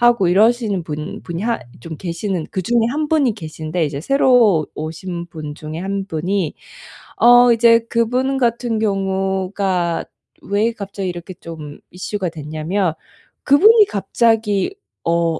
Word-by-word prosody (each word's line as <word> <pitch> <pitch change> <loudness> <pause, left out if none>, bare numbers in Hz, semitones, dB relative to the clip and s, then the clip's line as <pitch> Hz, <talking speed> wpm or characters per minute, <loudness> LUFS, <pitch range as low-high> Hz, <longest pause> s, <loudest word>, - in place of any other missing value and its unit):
하고 240 -6 +4
이러시는 215 0 +2
분 155 -1 -6
분이 170 0 -5
하 235 0 -1 0.2
좀 160 +2 -8
계시는 175 +1 -3
그중에 225 +5 +1
1 300 +3 -2
분이 290 -6 +2
계신데 160 -2 -3
이제 140 0 -5
새로 235 - +4
오신 170 +3 -5
분 155 -3 -7
중에 155 +1 -7
1 195 +2 -3
분이 180 +1 -1 0.7
어 245 +1 +7
이제 230 0 +5
그분 250 +4 +1
같은 235 -2 0
경우가 190 -3 -1 0.4
왜 210 +3 +1
갑자기 200 -3 -5
이렇게 175 +1 -7
좀 160 -4 -10
이슈가 185 0 -3
됐냐면 160 +3 -2 0.5
그분이 420 +10 +6
갑자기 220 - +1 0.3
어 170 -1 +1
195 Hz, 250 characters per minute, -19 LUFS, 165-230 Hz, 0.7 s, 어